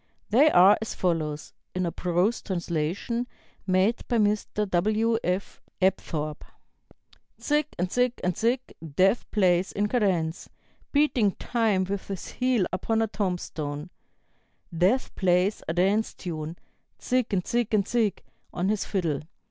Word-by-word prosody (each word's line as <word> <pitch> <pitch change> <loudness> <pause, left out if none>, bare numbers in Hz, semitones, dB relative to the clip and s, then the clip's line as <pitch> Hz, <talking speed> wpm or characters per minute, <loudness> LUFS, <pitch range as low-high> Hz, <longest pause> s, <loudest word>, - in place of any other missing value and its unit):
They 275 +8 +6
are 190 -3 +6
as 220 - -4
follows 155 -4 -2 0.2
(in 185 0 0
a 170 - -1
prose 180 +7 0
translation 180 +6 -2 0.4
made 190 +5 +2
by 240 - +1
Mr. 210 0 +1
W. 215 +5 +1
F. 180 +2 -2 0.2
Apthorp): 155 -5 0 1.0
"Zig 300 0 +1
and 180 +1 -1
Zig 250 -1 +2
and 180 -1 0
Zig, 240 +3 +1 0.3
Death 195 +7 +3
plays 185 -3 +2
in 205 +1 0
cadence, 185 -8 0 0.4
Beating 260 -9 +3
time 220 -6 +1
with 195 +1 -4
his 195 -3 -5
heel 250 -6 +1
upon 225 +4 +1
a - - 0
tombstone; 175 -6 -3 0.8
Death 190 +10 +2
plays 185 +2 +2
a 160 - -1
dance 200 +5 +1
tune, 160 -2 -5 0.4
Zig 250 -2 0
and 185 -3 0
Zig 240 -2 0
and 205 -3 +2
Zig, 225 -5 0 0.3
on 180 +2 -1
his 210 -1 0
fiddle. 170 -8 -1
195 Hz, 135 wpm, -26 LUFS, 175-225 Hz, 1.0 s, They